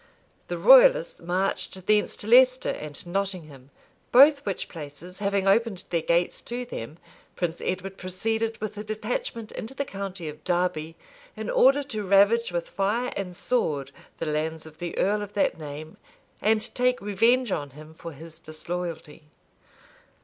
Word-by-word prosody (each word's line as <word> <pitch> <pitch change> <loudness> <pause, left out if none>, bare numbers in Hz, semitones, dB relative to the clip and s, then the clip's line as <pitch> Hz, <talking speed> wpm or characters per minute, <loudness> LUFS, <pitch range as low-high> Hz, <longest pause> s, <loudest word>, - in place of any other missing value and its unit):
The - - -3
royalists - - +6
marched 185 0 -2
thence 210 -1 +2
to 205 - -7
Leicester 255 +2 +5
and 150 +1 -7
Nottingham; 175 -8 -4 0.4
both 280 +3 +7
which 195 - -2
places 165 +4 -10
having 200 -1 0
opened 205 -1 +2
their 170 -2 +1
gates 170 +2 +1
to 245 +1 -5
them, 150 - -7 0.4
Prince 170 -2 -2
Edward 185 +1 -3
proceeded 220 +5 -2
with 215 -1 -4
a - - -4
detachment 215 +1 -4
into 240 +5 -7
the 280 - -2
county 195 -6 -6
of 150 0 -8
Derby, 175 -3 -1 0.4
in - - -3
order 285 - +5
to 225 -6 -5
ravage 200 +3 +4
with 170 -1 -2
fire 220 +6 -1
and 180 -3 -4
sword 145 - 0 0.3
the - - -3
lands 155 +1 -2
of 160 0 -14
the 175 -1 -5
earl 210 +2 +2
of 205 -1 -7
that 200 - +1
name, 155 +1 -8 0.4
and 215 0 +1
take 250 0 +2
revenge 230 +4 +2
on, 145 -5 -2
him 155 +3 -13
for 165 +1 -9
his 160 +2 -12
disloyalty. 165 -1 -6
195 Hz, 155 wpm, -26 LUFS, 165-225 Hz, 0.4 s, both